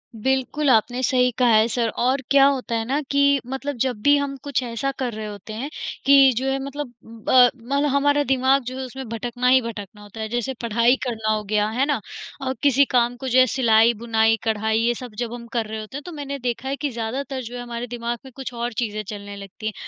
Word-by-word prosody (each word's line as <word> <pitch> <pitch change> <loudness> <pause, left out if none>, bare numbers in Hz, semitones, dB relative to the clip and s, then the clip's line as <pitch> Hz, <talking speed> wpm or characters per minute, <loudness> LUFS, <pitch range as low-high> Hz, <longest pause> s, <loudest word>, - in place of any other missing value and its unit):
बिल्कुल, 265 +5 0
आपने 245 +1 +2
सही 250 0 +3
कहा 250 -1 +3
है, 215 +1 +5
सर 235 -1 0
और 255 +5 0
क्या 275 -1 +7
होता 265 -4 0
है 225 0 -1
ना 275 +4 0
कि 280 0 +4
मतलब 270 +2 -4
जब 250 -5 -1
भी 285 0 +6
हम 280 -1 -2
कुछ 280 -3 -1
ऐसा 240 +3 -2
कर 250 -3 -2
रहे 215 0 -5
होते 210 +1 -8
हैं 250 +7 -4 0.4
कि 275 -1 +7
जो 265 +1 0
है, 270 - 0
मतलब 285 0 -5 0.4
अ, 250 -1 +7
मतलब 275 +4 -1
हमारा 285 +1 +2
दिमाग 265 +1 +2
जो 255 +2 -6
है, 265 - -4
उसमें 265 +1 -8
भटकना 240 +2 -2
ही 260 0 +6
भटकना 210 -3 -8
होता 205 +2 -12
है, 220 - -2
जैसे 240 +3 -2
पढ़ाई 235 +2 +3
करना 220 -3 -2
हो 215 0 -2
गया, 210 +1 +1
है 250 +5 +1
ना? 285 -5 0 0.4
अ, 260 -1 -1
किसी 280 0 +5
काम 245 -1 +1
को, 265 - -6
जो 255 0 +4
है, 255 - +7
सिलाई, 230 -2 +4
बुनाई, 225 -1 +3
कढ़ाई, 220 -1 0
ये 235 +1 +2
सब 245 -2 -9
जब 240 -1 -3
हम 240 -1 -8
कर 230 -2 0
रहे 220 0 -5
होते 215 +6 -7
हैं, - - -6
तो 355 - -7
मैंने 280 -2 -5
देखा 245 +1 -3
है 275 - -1
कि 290 0 -2
ज़्यादातर 260 +4 -4
जो 240 +1 -8
है, 245 - -5
हमारे 240 0 -5
दिमाग 235 0 -4
में 265 - -11
कुछ 265 -2 -6
और 235 0 -3
चीज़ें 215 -2 -2
चलने 205 0 -8
लगती 200 +2 -10
हैं। 215 - -2
245 Hz, 240 wpm, -22 LUFS, 225-270 Hz, 0.4 s, क्या